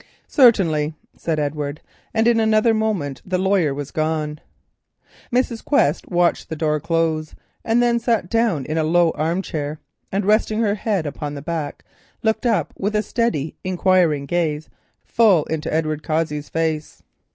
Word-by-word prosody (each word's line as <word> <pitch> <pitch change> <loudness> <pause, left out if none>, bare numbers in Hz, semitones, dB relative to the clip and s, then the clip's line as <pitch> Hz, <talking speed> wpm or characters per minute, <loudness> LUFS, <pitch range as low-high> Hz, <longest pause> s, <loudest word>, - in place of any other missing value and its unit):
"Certainly," 165 - +4 0.2
said 165 -2 -2
Edward, 145 0 -3 0.3
and 225 +1 +2
in 235 -1 +4
another 220 +1 +3
moment 200 - -1
the 185 0 -1
lawyer 190 -5 +2
was 140 0 -5
gone. 155 -1 -2 0.9
Mrs. 245 -2 0
Quest 290 -1 +1
watched 175 -1 +1
the 160 - -3
door 150 -1 0
close 165 -1 -1 0.3
and 230 +2 +2
then 235 -1 +2
sat 230 -6 0
down 215 - +1
in 155 +1 -1
a - - +2
low 170 +1 +3
armchair, 155 -2 -2 0.3
and 195 +1 -1
resting 215 +1 +2
her 215 -3 +2
head 205 -4 -1
upon 145 0 -5
the 140 - -6
back, 160 -3 -4 0.4
looked 220 +3 +1
up 225 -3 0
with 205 +2 -2
a 210 - +2
steady, 170 - -1
enquiring 180 -5 +2
gaze, 155 -1 -1 0.4
full 205 -9 +4
into 160 -1 -3
Edward 155 -1 -1
Cossey's 155 -2 -2
face. 160 -2 -2
165 Hz, 150 wpm, -21 LUFS, 155-215 Hz, 0.9 s, Certainly